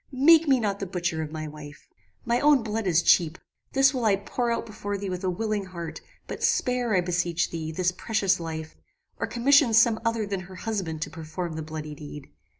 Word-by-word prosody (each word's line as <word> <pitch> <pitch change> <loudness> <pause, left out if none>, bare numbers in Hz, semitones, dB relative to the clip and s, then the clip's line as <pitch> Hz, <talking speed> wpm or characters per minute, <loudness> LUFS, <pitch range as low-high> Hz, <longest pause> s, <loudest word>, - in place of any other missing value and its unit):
Make 315 +5 +5
me 265 -2 +4
not 200 -3 -1
the 195 - -4
butcher 175 -3 -2
of 155 -1 -5
my 155 -1 -5
wife. 150 -1 -11 0.4
My 235 +1 +2
own 290 -4 +4
blood 220 -1 -2
is 170 -1 +3
cheap. 170 -1 +4 0.4
This 270 +1 +5
will 255 -3 -2
I 210 -3 +4
pour 235 +4 -2
out 230 - -1
before 205 -2 -5
thee 195 -1 -4
with 180 +1 -4
a 185 - +1
willing 210 +2 -2
heart; 170 -4 -7 0.2
but - - -7
spare, 250 -4 +1
I 180 - +4
beseech 175 -1 -1
thee, 160 -1 -4
this 180 +2 0
precious 195 -1 0
life, 160 -1 -6 0.4
or - - -1
commission 255 -1 +4
some 230 -1 +5
other 230 -2 0
than 200 -1 -3
her 185 +1 -11
husband 180 -7 -3
to - - -7
perform 165 +2 -5
the 160 - -4
bloody 155 -1 -6
deed. 145 -1 -10
190 Hz, 210 wpm, -26 LUFS, 165-230 Hz, 0.4 s, Make